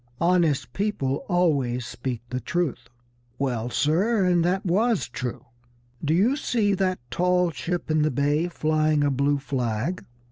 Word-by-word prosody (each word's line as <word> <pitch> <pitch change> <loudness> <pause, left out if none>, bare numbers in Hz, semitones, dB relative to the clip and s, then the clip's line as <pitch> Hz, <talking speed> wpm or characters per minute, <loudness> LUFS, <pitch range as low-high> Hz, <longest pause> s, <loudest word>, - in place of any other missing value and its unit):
Honest 165 -8 +2
people 170 -10 -1
always 140 -9 +1
speak 120 0 -5
the 125 - -1
truth." 130 -3 -2 0.5
"Well, 125 -3 -1
sir, 185 - +2
and 175 -2 +3
that 185 +3 0
was 215 +4 +1
true. 125 -2 -5 0.6
Do 155 +2 +2
you 220 +10 +3
see 220 -8 +1
that 185 -1 0
tall 180 -1 +2
ship 170 0 -3
in 155 0 +3
the 155 - +3
bay 145 +5 +1
flying 155 -2 +1
a 145 - +2
blue 140 +2 +1
flag?" 135 +3 -2
155 Hz, 145 wpm, -25 LUFS, 135-180 Hz, 0.6 s, and